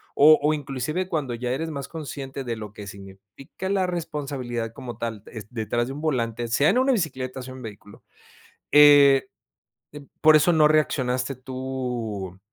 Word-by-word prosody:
o 155 Hz, +2 st, +7 dB
o 150 Hz, +1 st, +2 dB
inclusive 150 Hz, +5 st, -3 dB
cuando 150 Hz, -8 st, -2 dB
ya 120 Hz, +1 st, -3 dB
eres 160 Hz, +5 st, -3 dB
más 140 Hz, -3 st, -5 dB
consciente 140 Hz, -4 st, -7 dB
de 120 Hz, -2 st, -3 dB
lo 105 Hz, -1 st, -8 dB
que 105 Hz, -, -9 dB
significa 100 Hz, -, -10 dB
la 190 Hz, -2 st, +1 dB
responsabilidad 140 Hz, -9 st, -4 dB
como 120 Hz, -2 st, -8 dB
tal, 115 Hz, -3 st, -4 dB
es 110 Hz, -3 st, -9 dB
detrás 120 Hz, +1 st, -2 dB
de 135 Hz, -, -5 dB
un 145 Hz, -, -7 dB
volante, 120 Hz, -6 st, -1 dB
sea 140 Hz, +6 st, +3 dB
en -, -, +2 dB
una 265 Hz, +1 st, +3 dB
bicicleta 130 Hz, -, -3 dB
o -, -, -8 dB
sea 130 Hz, 0 st, -9 dB
un 130 Hz, -, -10 dB
vehículo, 105 Hz, -2 st, -11 dB, 0.7 s
eh 145 Hz, -2 st, +7 dB, 0.7 s
eh 145 Hz, -1 st, -10 dB, 0.2 s
por 155 Hz, -1 st, +7 dB
eso 170 Hz, +3 st, +3 dB
no 155 Hz, -1 st, +5 dB
reaccionaste 130 Hz, -4 st, 0 dB
tú, 125 Hz, -7 st, -5 dB
130 Hz, 170 wpm, -24 LUFS, 115-150 Hz, 0.7 s, o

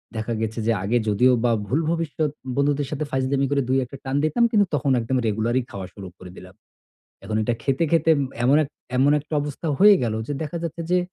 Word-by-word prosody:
দেখা 110 Hz, +1 st, -3 dB
গেছে 110 Hz, +1 st, -3 dB
যে -, -, +4 dB
আগে 115 Hz, +5 st, +1 dB
যদিও 125 Hz, +5 st, +4 dB
বা 120 Hz, -, +3 dB, 0.2 s
ভুল 140 Hz, +9 st, +1 dB
ভবিষ্যত 160 Hz, -2 st, -1 dB, 0.3 s
বন্ধুদের 140 Hz, 0 st, +1 dB
সাথে 150 Hz, +1 st, -2 dB
ফাইজলামি 135 Hz, +1 st, 0 dB
করে 140 Hz, -1 st, +2 dB
দুই 130 Hz, -, +3 dB
একটা 135 Hz, +2 st, -10 dB
টান 135 Hz, +1 st, -3 dB
দিতাম 155 Hz, +10 st, +2 dB
কিন্তু 205 Hz, -2 st, +4 dB
তখন 140 Hz, -1 st, 0 dB
একদম 130 Hz, +3 st, -1 dB
রেগুলারই 115 Hz, +4 st, 0 dB
খাওয়া 95 Hz, -2 st, -6 dB
শুরু 95 Hz, -2 st, -9 dB
করে 90 Hz, -1 st, -11 dB
দিলাম। 90 Hz, 0 st, -12 dB, 0.7 s
এখন 110 Hz, +1 st, -3 dB
এটা 115 Hz, +2 st, 0 dB
খেতে, 135 Hz, +4 st, +1 dB
খেতে 165 Hz, -1 st, +3 dB
ম -, -, +1 dB, 0.2 s
এমন 140 Hz, +4 st, +5 dB
এক 140 Hz, -, -4 dB, 0.3 s
এমন 140 Hz, +3 st, +4 dB
একটা 150 Hz, +2 st, -7 dB
অবস্থা 145 Hz, +3 st, -6 dB
হয়ে 205 Hz, +1 st, +8 dB
গেলো 110 Hz, -2 st, -1 dB
যে 145 Hz, -, -3 dB
দেখা 155 Hz, +2 st, -5 dB
যাচ্ছে 170 Hz, 0 st, -4 dB
যে 180 Hz, -, +4 dB
135 Hz, 215 wpm, -23 LUFS, 115-150 Hz, 0.7 s, হয়ে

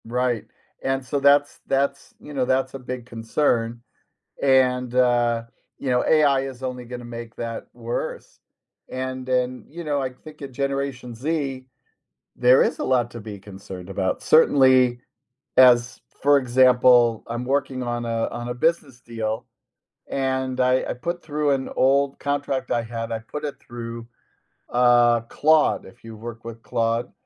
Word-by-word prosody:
Right, 120 Hz, -1 st, -1 dB, 0.4 s
and, 135 Hz, 0 st, -1 dB
so, 140 Hz, +2 st, -1 dB
that's 140 Hz, +1 st, +3 dB
that's 140 Hz, +1 st, -1 dB
you 150 Hz, -, -11 dB
know, 130 Hz, -2 st, 0 dB
that's 130 Hz, +1 st, 0 dB
a 135 Hz, -, -6 dB
big 125 Hz, -1 st, -6 dB
concern, 115 Hz, 0 st, -1 dB, 0.6 s
and, 125 Hz, -2 st, +3 dB
uh, 120 Hz, -2 st, +3 dB, 0.4 s
you 135 Hz, -, -3 dB
know, 125 Hz, 0 st, +2 dB
AI 145 Hz, -3 st, +4 dB
is 135 Hz, -1 st, -7 dB
only 125 Hz, -1 st, -4 dB
gonna 120 Hz, 0 st, -8 dB
make 120 Hz, -1 st, -8 dB
that 115 Hz, -1 st, -5 dB
worse. -, -, -5 dB, 0.5 s
And, 130 Hz, 0 st, -5 dB
then, 125 Hz, 0 st, -1 dB
you 170 Hz, +3 st, -8 dB
know, 145 Hz, -2 st, 0 dB
I 130 Hz, -1 st, -2 dB
think 150 Hz, +4 st, -15 dB
at 135 Hz, -1 st, -7 dB
Generation 135 Hz, -2 st, -3 dB
Z, 135 Hz, 0 st, -3 dB, 0.7 s
there 125 Hz, +1 st, +5 dB
is -, -, 0 dB
a -, -, -2 dB
lot 125 Hz, -2 st, +1 dB
to 120 Hz, -, -7 dB
be 105 Hz, -1 st, -8 dB
concerned 95 Hz, -2 st, -10 dB
about, 95 Hz, -1 st, -2 dB
certainly 130 Hz, -5 st, +5 dB, 0.6 s
as 125 Hz, -2 st, +5 dB, 0.2 s
for 145 Hz, 0 st, +6 dB
example, 125 Hz, -2 st, +4 dB
I'm 120 Hz, +1 st, -4 dB
working 135 Hz, -1 st, -1 dB
on 120 Hz, -1 st, -3 dB
a 115 Hz, -1 st, -1 dB
on 120 Hz, 0 st, -6 dB
a -, -, -2 dB
business 140 Hz, -2 st, 0 dB
deal 115 Hz, -1 st, -4 dB, 0.6 s
and 130 Hz, -1 st, -1 dB
I 130 Hz, 0 st, +3 dB
I -, -, 0 dB
put 170 Hz, +6 st, -5 dB
through 150 Hz, -1 st, 0 dB
an 135 Hz, -1 st, -1 dB
old 140 Hz, +1 st, +2 dB
contract 140 Hz, -1 st, -2 dB
I 120 Hz, -, +2 dB
had 115 Hz, 0 st, -5 dB
I 115 Hz, -, -2 dB
put 145 Hz, +7 st, -7 dB
it 145 Hz, -, -6 dB
through, 115 Hz, -1 st, -8 dB, 0.6 s
uh, 120 Hz, -1 st, +4 dB
Claude, 155 Hz, +6 st, +2 dB
if 95 Hz, -, -16 dB
you 115 Hz, -1 st, -9 dB
work 115 Hz, +1 st, -8 dB
with 115 Hz, 0 st, -8 dB
Claude, 115 Hz, +1 st, -1 dB
125 Hz, 160 wpm, -23 LUFS, 120-135 Hz, 0.7 s, for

